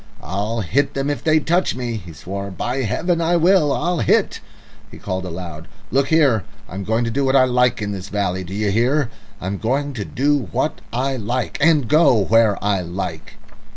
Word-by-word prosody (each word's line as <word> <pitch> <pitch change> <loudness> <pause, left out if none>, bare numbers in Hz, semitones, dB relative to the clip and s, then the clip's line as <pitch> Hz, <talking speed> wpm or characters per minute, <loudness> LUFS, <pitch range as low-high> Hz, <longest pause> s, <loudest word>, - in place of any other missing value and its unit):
"I'll 105 +6 -2
hit 140 +9 0
them 135 +1 0
if 145 - -4
they 155 0 +4
touch 175 +4 +1
me," 120 -2 -3
he 85 -5 -10
swore; 100 +5 -6
"by 120 +8 -3
Heaven, 165 - 0
I 170 +1 +2
will. 170 -3 +4
I'll 175 +4 0
hit." 110 - +2 0.5
He - - -12
called 95 -1 -4
aloud, 85 -2 -7 0.2
"Look 135 +1 +2
here, 140 - +3 0.2
I'm 95 +1 -6
going 110 +4 0
to 115 - -2
do 140 +4 0
what 135 0 +2
I 130 - +7
like 125 -3 +2
in 105 - -3
this 100 -1 -6
valley. 95 -3 -1
Do 95 +2 -7
you 105 -1 0
hear? 120 +4 +1 0.3
I'm 95 +2 -4
going 140 +5 -1
to 110 -5 -4
do 140 +1 0
what - - -1
I 130 +2 -1
like 120 +2 -3
and 150 -5 +4
go 150 -2 +5
where 110 0 +3
I 100 -2 +1
like!" 85 -3 -6
115 Hz, 195 wpm, -20 LUFS, 100-140 Hz, 0.5 s, I